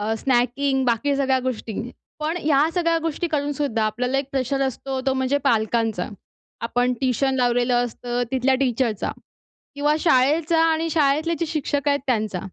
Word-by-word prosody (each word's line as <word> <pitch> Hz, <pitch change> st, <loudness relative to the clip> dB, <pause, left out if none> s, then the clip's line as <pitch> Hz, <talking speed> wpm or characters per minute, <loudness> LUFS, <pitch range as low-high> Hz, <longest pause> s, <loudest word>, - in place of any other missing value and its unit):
अ, 215 Hz, +2 st, -1 dB
snacking 265 Hz, +2 st, +1 dB
बाकी 245 Hz, +4 st, +1 dB
सगळ्या 265 Hz, -1 st, +2 dB
गोष्टी. 220 Hz, -3 st, -5 dB, 0.5 s
पण 315 Hz, +3 st, -1 dB
ह्या 295 Hz, 0 st, +3 dB
सगळ्या 335 Hz, -2 st, +2 dB
गोष्टी 330 Hz, +1 st, -2 dB
करून 290 Hz, -2 st, -1 dB
सुद्धा 260 Hz, -6 st, -1 dB
आपल्याला 250 Hz, +5 st, -1 dB
एक 275 Hz, -, -1 dB
प्रेशर 270 Hz, +1 st, -1 dB
असतो. 265 Hz, +1 st, -4 dB
तो 265 Hz, -, +3 dB
म्हणजे 260 Hz, +2 st, +1 dB
पालकांचा. 225 Hz, -5 st, +1 dB, 0.5 s
आपण 245 Hz, +2 st, 0 dB
ट्युशन 265 Hz, +1 st, +1 dB
लावलेलं 245 Hz, 0 st, +2 dB
असतं 245 Hz, +1 st, -3 dB
तिथल्या 265 Hz, 0 st, +2 dB
टीचरचा 245 Hz, -4 st, 0 dB, 0.6 s
किंवा 295 Hz, +1 st, +1 dB
शाळेचा 310 Hz, +3 st, +3 dB
आणि 325 Hz, 0 st, +1 dB
शाळेतले 310 Hz, +2 st, +2 dB
जे 335 Hz, -, 0 dB
शिक्षक 290 Hz, -2 st, -1 dB
आहेत 285 Hz, 0 st, +3 dB
त्यांचा. 215 Hz, -6 st, 0 dB
265 Hz, 155 wpm, -23 LUFS, 245-290 Hz, 0.6 s, ह्या